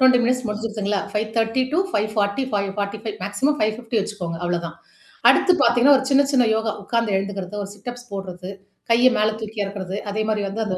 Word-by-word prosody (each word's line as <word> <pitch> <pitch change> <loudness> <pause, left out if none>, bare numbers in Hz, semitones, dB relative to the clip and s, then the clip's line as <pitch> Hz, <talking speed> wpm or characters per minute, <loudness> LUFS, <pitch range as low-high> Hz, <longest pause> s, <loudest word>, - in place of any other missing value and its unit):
20 260 -1 +6
minutes 250 +1 +1
முடிஞ்சிருச்சுங்களா? 210 -2 -2
5.30 225 +3 0
two 335 - +3
5.45 205 0 0 0.5
maximum 265 +10 0
5.50 220 +1 0
வச்சுக்கோங்க 175 -5 -5
அவ்வளோதான். 170 -1 -2 0.6
அடுத்து 365 - +4
பாத்தீங்கன்னா, 245 +4 +6
ஒரு 265 - -5
சின்ன 280 +1 +5
சின்ன 250 -3 +4
யோகா 220 0 -1
உக்கார்ந்து 230 -2 0
எழுந்துக்கிறது, 195 0 -4
ஒரு 195 - -8
சிட்அப்ஸ் 245 +4 -8
போடுறது, 185 -1 -6 0.4
கைய 240 +2 +6
மேல 215 +1 +3
தூக்கி 215 0 -4
எறக்கறது, 195 -1 -5
அதே 215 +1 -1
மாரி 210 -1 0
வந்து 220 +3 -2
அந்த 185 -3 -2
215 Hz, 160 wpm, -22 LUFS, 200-240 Hz, 0.6 s, 20